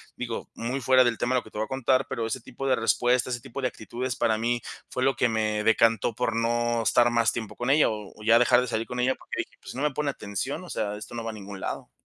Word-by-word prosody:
digo, 120 Hz, -2 st, -5 dB
muy 120 Hz, +4 st, -3 dB
fuera 130 Hz, +1 st, +6 dB
del 120 Hz, -2 st, +1 dB
tema 125 Hz, +2 st, 0 dB
de 125 Hz, -, +4 dB
lo -, -, -21 dB
que 110 Hz, -, -15 dB
te -, -, -9 dB
voy 110 Hz, -, 0 dB
a -, -, -16 dB
contar, 130 Hz, 0 st, +1 dB
pero 115 Hz, -, -2 dB
ese 115 Hz, +3 st, -2 dB
tipo 130 Hz, +3 st, -7 dB
de 130 Hz, -2 st, +3 dB
respuestas, 120 Hz, +2 st, +2 dB
ese 120 Hz, -, -4 dB
tipo 135 Hz, +1 st, -6 dB
de 130 Hz, -, +2 dB
actitudes 125 Hz, +3 st, -4 dB
para 110 Hz, -2 st, +2 dB
mí 120 Hz, +1 st, 0 dB, 0.3 s
fue 130 Hz, -, -2 dB
lo 135 Hz, -1 st, +3 dB
que 125 Hz, -, +3 dB
me 110 Hz, -1 st, 0 dB
decantó 115 Hz, 0 st, +3 dB
por 125 Hz, -2 st, 0 dB
no 120 Hz, 0 st, +1 dB
estar 120 Hz, +1 st, +4 dB
más 115 Hz, -1 st, +3 dB
tiempo 110 Hz, -3 st, -5 dB
con 120 Hz, +2 st, -2 dB
ella, 150 Hz, +1 st, +5 dB
o 105 Hz, -2 st, -6 dB
o 105 Hz, -, -13 dB
ya 115 Hz, +2 st, +6 dB
dejar 125 Hz, 0 st, +5 dB
de 125 Hz, -, -2 dB
salir 110 Hz, -1 st, -2 dB
con 125 Hz, 0 st, -5 dB
ella, 130 Hz, +1 st, +2 dB
porque -, -, -16 dB
dije: -, -, -5 dB
"Pues, -, -, -9 dB
si -, -, -9 dB
no 140 Hz, -, -2 dB
me 150 Hz, -, +2 dB
pone 150 Hz, 0 st, -1 dB
atención, 130 Hz, -, -4 dB
o 180 Hz, -, -11 dB
sea, 105 Hz, -1 st, -2 dB
esto 105 Hz, +2 st, -9 dB
no 115 Hz, -, -4 dB
va 115 Hz, -, -2 dB
a -, -, -10 dB
ningún 100 Hz, -2 st, -8 dB
lado". -, -, -5 dB
120 Hz, 295 wpm, -26 LUFS, 110-125 Hz, 0.3 s, fuera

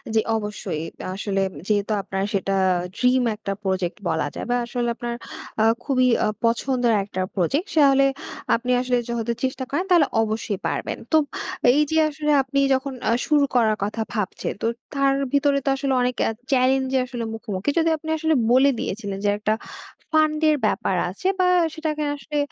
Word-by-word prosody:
জি, -, -, +5 dB, 0.2 s
অবশ্যই। 210 Hz, -6 st, -4 dB, 0.3 s
আসলে, 195 Hz, 0 st, -1 dB
উম -, -, -15 dB
যেহেতু 210 Hz, 0 st, +1 dB
আপনার 195 Hz, 0 st, -3 dB
সেটা 195 Hz, 0 st, 0 dB, 0.4 s
ড্রিম 250 Hz, 0 st, +3 dB
একটা 210 Hz, -1 st, -5 dB
প্রজেক্ট 190 Hz, -2 st, -1 dB
বলা 160 Hz, -2 st, 0 dB
যায় -, -, -5 dB
বা -, -, +3 dB
আসলে, 240 Hz, 0 st, -2 dB
আপনার 235 Hz, 0 st, -4 dB, 0.5 s
আ -, -, +5 dB, 0.2 s
খুবই 255 Hz, -3 st, +2 dB, 0.2 s
আ -, -, +2 dB, 0.2 s
পছন্দের 240 Hz, 0 st, +1 dB
একটা 190 Hz, -1 st, -4 dB
প্রজেক্ট। 275 Hz, -, 0 dB
তাহলে 275 Hz, -2 st, +6 dB, 0.5 s
আপনি 245 Hz, +2 st, -2 dB
আসলে, 250 Hz, -1 st, +1 dB
যদি 235 Hz, -1 st, -2 dB
যখন 235 Hz, -, -15 dB
চেষ্টা 260 Hz, 0 st, -3 dB
করেন, 345 Hz, +7 st, -1 dB
তাহলে 335 Hz, -5 st, +6 dB
অবশ্যই 215 Hz, -2 st, -2 dB
পারবেন। -, -, -3 dB
তো 315 Hz, -, +6 dB, 0.6 s
এই 295 Hz, -, +3 dB
যে, 320 Hz, -, +2 dB
আসলে, 300 Hz, 0 st, -1 dB
আপনি 270 Hz, +1 st, -1 dB
যখন 265 Hz, +1 st, -1 dB, 0.2 s
আ -, -, +3 dB, 0.2 s
শুরু 295 Hz, -2 st, +4 dB
করার 220 Hz, -3 st, +3 dB
কথা 210 Hz, +3 st, -2 dB
ভাবছেন। 210 Hz, -4 st, -2 dB
তো -, -, +1 dB, 0.3 s
তার 275 Hz, -1 st, +2 dB, 0.2 s
ভিতরে 280 Hz, 0 st, +3 dB
তো -, -, +2 dB
আসলে, 275 Hz, -1 st, -1 dB
অনেক 250 Hz, 0 st, 0 dB
এ -, -, +1 dB, 0.2 s
চেলেঞ্জ 265 Hz, 0 st, +3 dB
যে, -, -, +4 dB
আসলে 245 Hz, -2 st, -5 dB
মুখোমুখি, 210 Hz, 0 st, -3 dB
যদিও 330 Hz, 0 st, +3 dB
আপনি 315 Hz, +1 st, -8 dB
আসলে 315 Hz, 0 st, +1 dB, 0.2 s
বলে 260 Hz, +3 st, +6 dB
দিয়েছিলেন 200 Hz, -1 st, -4 dB
যে, -, -, +4 dB
একটা 215 Hz, +1 st, +1 dB, 0.6 s
ফান্ডের 310 Hz, 0 st, +3 dB
ব্যাপার 195 Hz, -4 st, 0 dB
আছে 200 Hz, -, -4 dB
বা 365 Hz, -, +4 dB, 0.3 s
সেটাকে 310 Hz, -1 st, -2 dB
আসলে, 295 Hz, +1 st, -5 dB
250 Hz, 175 wpm, -23 LUFS, 210-280 Hz, 0.6 s, তাহলে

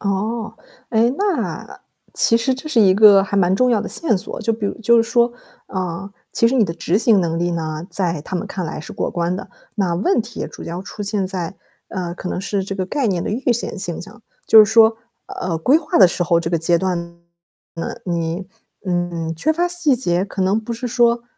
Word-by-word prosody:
哦。 215 Hz, +3 st, -2 dB, 0.4 s
诶， 230 Hz, +1 st, +3 dB
那 400 Hz, -1 st, -3 dB, 0.3 s
其 230 Hz, -, +4 dB
实 245 Hz, +3 st, +1 dB
这 270 Hz, +4 st, -8 dB
是 245 Hz, -7 st, +3 dB
一 190 Hz, -2 st, +5 dB
个 205 Hz, -1 st, +7 dB
还 200 Hz, +1 st, -3 dB
蛮 185 Hz, -1 st, +3 dB
重 250 Hz, +4 st, +2 dB
要 220 Hz, -3 st, +2 dB
的 215 Hz, -, -5 dB
线 250 Hz, -11 st, +2 dB
索， 190 Hz, -, -4 dB
就 225 Hz, 0 st, 0 dB
比 215 Hz, -2 st, -3 dB
如 -, -, -3 dB
就 235 Hz, +1 st, +4 dB
是 230 Hz, -, +5 dB
说， 235 Hz, +1 st, +2 dB, 0.3 s
呃， 185 Hz, +1 st, -4 dB, 0.2 s
其 230 Hz, -, +3 dB
实 245 Hz, -, +1 dB
你 235 Hz, -5 st, +4 dB
的 165 Hz, -, -3 dB
执 175 Hz, +3 st, 0 dB
行 220 Hz, -4 st, +4 dB
能 165 Hz, -1 st, -1 dB
力 175 Hz, +1 st, 0 dB
呢， 160 Hz, 0 st, -4 dB
在 175 Hz, -5 st, 0 dB
他 185 Hz, -, -4 dB
们 -, -, -4 dB
看 185 Hz, -3 st, -5 dB
来 155 Hz, -1 st, -5 dB
是 -, -, -9 dB
过 -, -, -3 dB
关 175 Hz, +1 st, -1 dB
的。 -, -, -7 dB, 0.3 s
那 190 Hz, -5 st, 0 dB
问 235 Hz, -, +1 dB
题 230 Hz, +2 st, -7 dB
也 -, -, -3 dB
主 -, -, -11 dB
要 175 Hz, +2 st, -6 dB
出 205 Hz, +1 st, -8 dB
现 200 Hz, -2 st, -1 dB
在， 185 Hz, -2 st, -4 dB, 0.3 s
呃， 175 Hz, -2 st, -4 dB
可 180 Hz, -, -6 dB
能 180 Hz, -, -3 dB
是 200 Hz, 0 st, -2 dB
这 195 Hz, +1 st, -5 dB
个 190 Hz, -1 st, -2 dB
概 265 Hz, +4 st, -1 dB
念 180 Hz, -4 st, 0 dB
的 -, -, -3 dB
预 245 Hz, +2 st, 0 dB
选 235 Hz, -3 st, -3 dB
现 175 Hz, -3 st, +1 dB
象， 210 Hz, +6 st, -11 dB, 0.3 s
就 220 Hz, -, +7 dB
是 210 Hz, -, -4 dB
说 225 Hz, 0 st, +6 dB, 0.3 s
呃， 170 Hz, -3 st, -4 dB
规 265 Hz, -, +4 dB
划 310 Hz, -6 st, -1 dB
的 190 Hz, -, +9 dB
时 175 Hz, -, -1 dB
候 170 Hz, -1 st, +2 dB
这 165 Hz, -, -3 dB
个 170 Hz, -, +1 dB
阶 170 Hz, +1 st, +2 dB
段 185 Hz, -1 st, -1 dB, 0.8 s
呢， 165 Hz, -, -4 dB
你， 170 Hz, +1 st, -3 dB, 0.4 s
嗯， 175 Hz, -2 st, -2 dB
缺 310 Hz, -, 0 dB
乏 345 Hz, +2 st, 0 dB
细 350 Hz, -7 st, +2 dB
节， 180 Hz, -6 st, +1 dB
可 195 Hz, -1 st, -7 dB
能 195 Hz, +4 st, +1 dB
不 225 Hz, +2 st, -6 dB
是 235 Hz, +2 st, -4 dB
说， 235 Hz, -1 st, +2 dB
195 Hz, 245 characters per minute, -19 LUFS, 175-230 Hz, 0.8 s, 的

